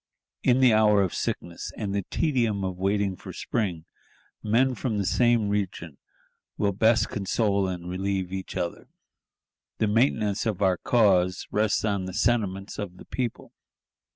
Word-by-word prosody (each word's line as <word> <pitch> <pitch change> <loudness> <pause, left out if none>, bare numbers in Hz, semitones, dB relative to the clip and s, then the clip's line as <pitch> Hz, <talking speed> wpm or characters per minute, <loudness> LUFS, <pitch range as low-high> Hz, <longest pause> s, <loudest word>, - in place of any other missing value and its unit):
In 130 +1 +3
the 125 -3 +6
hour 105 -2 +5
of 95 - -2
sickness, 85 -1 -4
and 100 -3 -3
the 100 - 0
tedium 120 - 0
of 95 -1 -4
waiting 100 0 0
for - - -10
spring, 90 -8 -3 0.6
men 125 +5 +2
from 120 -3 -2
the 100 - -1
same 120 0 +3
region 95 -7 -3 0.6
will 100 -1 +1
best 110 +4 +3
console 100 -1 0
and 90 -1 -5
relieve 95 0 -2
each 95 0 -5
other. 85 -2 -4 0.9
The 110 - +1
maintenance 110 -1 +1
of 105 -4 -1
our 95 -3 +2
cause 95 -6 +2
rests 105 0 +1
on 100 -3 -1
the 95 -1 -6
sentiments 105 -4 0
of 95 -3 -5
the - - -12
people. 125 -3 -4
100 Hz, 155 wpm, -26 LUFS, 95-110 Hz, 0.9 s, the